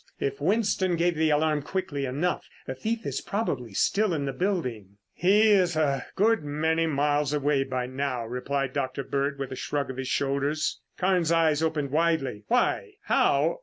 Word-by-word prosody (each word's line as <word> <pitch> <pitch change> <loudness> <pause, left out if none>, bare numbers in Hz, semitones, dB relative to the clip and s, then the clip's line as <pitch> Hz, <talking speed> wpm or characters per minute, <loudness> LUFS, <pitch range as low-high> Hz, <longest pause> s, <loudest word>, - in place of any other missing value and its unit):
If 140 +1 -2
Winston 195 0 +1
gave 175 +1 +2
the 160 0 +1
alarm 150 0 +2
quickly 145 -4 -3
enough, 150 +8 -2 0.2
the 130 - -4
thief 225 - -3
is - - -2
probably 130 - -3
still 200 - +2
in 140 -2 -2
the 135 - -2
building." 125 - -2 0.2
"He's 195 -1 +4
a 140 -3 0
good 220 -1 +3
many 160 +3 0
miles 145 -1 +1
away 145 -1 +2
by 130 -2 -2
now," 130 -2 -3
replied 130 +2 -2
Dr. 135 -1 -2
Bird 140 +1 -1
with 135 -1 -5
a - - -4
shrug 140 0 -2
of 130 - -10
his 135 -1 -4
shoulders. 140 +3 -1 0.2
Carnes' 180 -3 +2
eyes 160 -2 +3
opened 155 -4 -1
widely. 155 -8 0
"Why? 250 - +1
how? - - +2
150 Hz, 165 wpm, -27 LUFS, 135-175 Hz, 0.2 s, He's